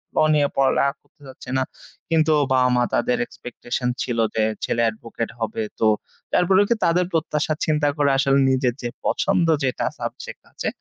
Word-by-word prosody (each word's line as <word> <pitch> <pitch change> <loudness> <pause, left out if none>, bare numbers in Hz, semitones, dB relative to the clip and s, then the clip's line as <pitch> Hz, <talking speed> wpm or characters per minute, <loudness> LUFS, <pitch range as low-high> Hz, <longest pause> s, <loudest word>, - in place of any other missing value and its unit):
law 155 - +4
নিয়ে 145 -1 +3
পড়ালেখা 140 +1 +3
করতে - - -35
চাচ্ছি 130 -1 -12
না 130 - +2 0.5
কিন্তু 160 -1 +3 0.2
বাবা 130 -1 +4
মা 125 - +3
তাদের 245 0 +1
expectation 125 - -5
ছিল 120 -1 -2 0.2
যে 110 - +2 0.2
ছেলে 115 - 0
advocate 115 +1 -6
হবে 110 0 -2 0.2
তো, 110 - +3 0.5
তারপরে 190 +2 +4
কি 235 - +3
তাদের 175 +2 +2
প্রত্যাশার 155 -1 0
চিন্তা 150 -1 +1
করে 145 -1 +3
আসলে 135 0 +3
নিজের 130 -2 +1
যে 120 - -3 0.2
পছন্দ 190 -3 +1 0.2
যেটা 130 -2 -1
subject - - -6
আছে - - -5
140 Hz, 165 wpm, -22 LUFS, 125-160 Hz, 0.5 s, law